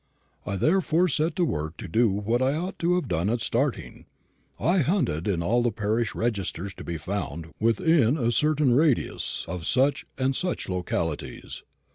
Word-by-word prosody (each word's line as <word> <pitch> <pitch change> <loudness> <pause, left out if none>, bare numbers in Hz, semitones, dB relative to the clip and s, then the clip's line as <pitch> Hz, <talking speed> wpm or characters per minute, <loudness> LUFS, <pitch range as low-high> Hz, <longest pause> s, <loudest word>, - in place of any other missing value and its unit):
I 100 - -1
therefore 170 - +2
set 155 +1 0
to 180 - +2
work 80 - -3
to - - -7
do 115 +7 +3
what 105 +5 0
I 135 +2 +2
ought 180 +5 -4
to 175 +1 +2
have 180 - -1
done 90 +2 0
at 120 +2 0
starting 125 +4 -2 0.5
I 180 +3 +2
hunted 140 - 0
in 90 -5 0
all 120 +7 +2
the 120 -1 +1
parish 110 +2 -1
registers 100 -4 -2
to - - -10
be 85 - -4
found 80 -2 -4
within 130 +3 +3
a 120 -4 +1
certain 150 0 +2
radius 145 -1 +1
of 85 -1 -5
such 135 +3 +2
and 130 0 0
such 180 +4 -2
localities. 85 -4 -3
120 Hz, 170 wpm, -26 LUFS, 95-150 Hz, 0.5 s, do